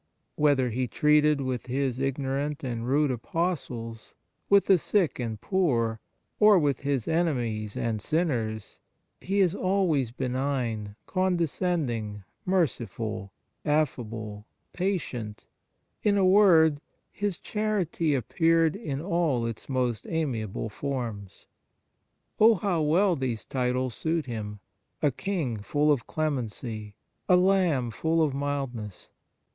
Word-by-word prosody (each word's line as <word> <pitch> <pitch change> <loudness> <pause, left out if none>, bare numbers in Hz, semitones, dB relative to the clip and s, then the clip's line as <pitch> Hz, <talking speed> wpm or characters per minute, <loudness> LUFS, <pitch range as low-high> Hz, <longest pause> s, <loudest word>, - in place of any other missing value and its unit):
Whether 140 -5 +3
He 125 +3 -1
treated 150 +1 +3
with 130 -2 -3
His 130 0 -1
ignorant 135 +2 -2
and 120 -2 -3
rude 145 +1 +2
Apostles, 120 -5 -3 0.3
with 200 0 +6
the 190 -3 +5
sick 185 -4 +1
and 115 -3 -3
poor, 120 - +1 0.4
or 210 -2 +7
with 145 -5 +1
His 140 -4 -1
enemies 120 -11 -1
and 110 -3 -1
sinners, 115 - -1 0.4
He 195 +2 0
is 180 -3 +3
always 185 - +1
benign, 125 -4 -2
condescending, 165 - -1 0.2
merciful, 110 - -1 0.3
affable, 115 -8 -2 0.3
patient; 140 - -3 0.6
in 205 -1 +2
a 195 - +4
word, 170 -7 +5 0.3
His 205 -2 -2
charity 190 -8 -1
appeared 165 +5 +2
in 150 -10 -4
all 165 -9 0
its 115 +2 -6
most 125 -4 -1
amiable 115 - -2
forms. 115 -5 -5 0.9
Oh, 225 +1 +7
how 180 -3 0
well 175 +5 +3
these 125 -6 -3
titles 125 -1 -1
suit 160 +3 -1
Him! 105 -4 -6 0.4
a 145 - +4
King 160 - -2
full 145 +8 +1
of 135 -5 0
clemency, 115 -7 -3 0.3
a 180 - +7
Lamb 180 -10 +2
full 160 +7 +1
of 145 -3 0
mildness. 135 -8 -4
140 Hz, 115 wpm, -27 LUFS, 115-170 Hz, 0.9 s, or